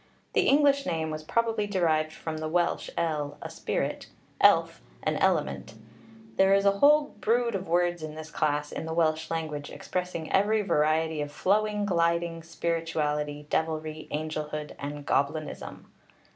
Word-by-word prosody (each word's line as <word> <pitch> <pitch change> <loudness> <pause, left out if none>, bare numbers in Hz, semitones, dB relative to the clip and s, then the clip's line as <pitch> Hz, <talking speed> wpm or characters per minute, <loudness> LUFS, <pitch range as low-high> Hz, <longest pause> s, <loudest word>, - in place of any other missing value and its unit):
The - - +3
English 280 0 +4
name 160 -1 -1
was 155 0 -4
probably 225 +5 0
derived 160 -5 +1
from 155 0 -5
the 155 0 -3
Welsh 175 +1 0
el, 150 -3 -1
a - - -7
spirit, - - -3 0.3
elf, - - +4 0.2
an - - 0
element; 115 - 0 0.6
there 195 0 +5
is 200 0 +2
a 200 0 +3
whole 295 +2 +5
brood 235 +1 +2
of 195 -1 -3
words 175 0 +1
of 155 -1 -6
this 155 0 -8
class 150 -1 0
in 160 - -5
the 160 - -3
Welsh 160 -1 +1
language, 155 -3 -3
expressing 180 -3 -4
every 210 +2 +3
variety 155 -2 +1
of 145 0 -4
flowing, 210 +6 +1
gliding, 170 -2 +1
spirituality, 155 -3 -2
devilry, 155 -1 -2
angelhood, 150 0 -4
and 145 0 -6
goblinism. 150 +2 -2
160 Hz, 145 wpm, -28 LUFS, 155-190 Hz, 0.6 s, there